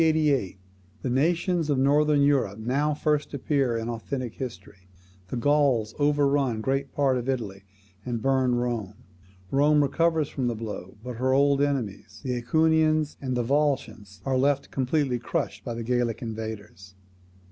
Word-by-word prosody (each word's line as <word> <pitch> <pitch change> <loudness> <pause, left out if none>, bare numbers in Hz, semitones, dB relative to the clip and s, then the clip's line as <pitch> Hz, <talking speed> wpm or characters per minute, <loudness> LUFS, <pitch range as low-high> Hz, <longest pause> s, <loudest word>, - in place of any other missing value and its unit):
The 150 - +2 0.5
nations 165 +4 +1
of 145 - +2
Northern 145 +2 +3
Europe 135 -8 +2
now 140 +7 0
first 150 -1 0
appear 135 -3 0
in 115 0 -4
authentic 120 +1 -4
history. 95 -6 -8 0.4
The 100 - -5
Gauls 135 -5 +2
overrun 145 -4 +2
great 135 +4 -1
part 135 -3 +1
of 125 +2 -5
Italy, 100 -7 -3 0.4
and 120 -1 -3
burn 130 0 +2
Rome. 120 -5 -2 0.6
Rome 145 +2 +4
recovers 160 +1 +1
from 130 -4 -2
the 120 - -1
blow, 105 -4 -7
but 125 -2 -6
her 130 +2 +1
old 140 0 +3
enemies, 115 -7 -2
the 130 - -2
AEquians 155 +4 +2
and 130 -2 -2
Volscians, 120 -6 -1
are 130 -1 +1
left 140 +1 +1
completely 130 -1 0
crushed - - -3
by 120 - -4
the 115 - -4
Gallic 120 -1 -1
invaders. 110 -4 -7
130 Hz, 145 wpm, -26 LUFS, 115-145 Hz, 0.6 s, Rome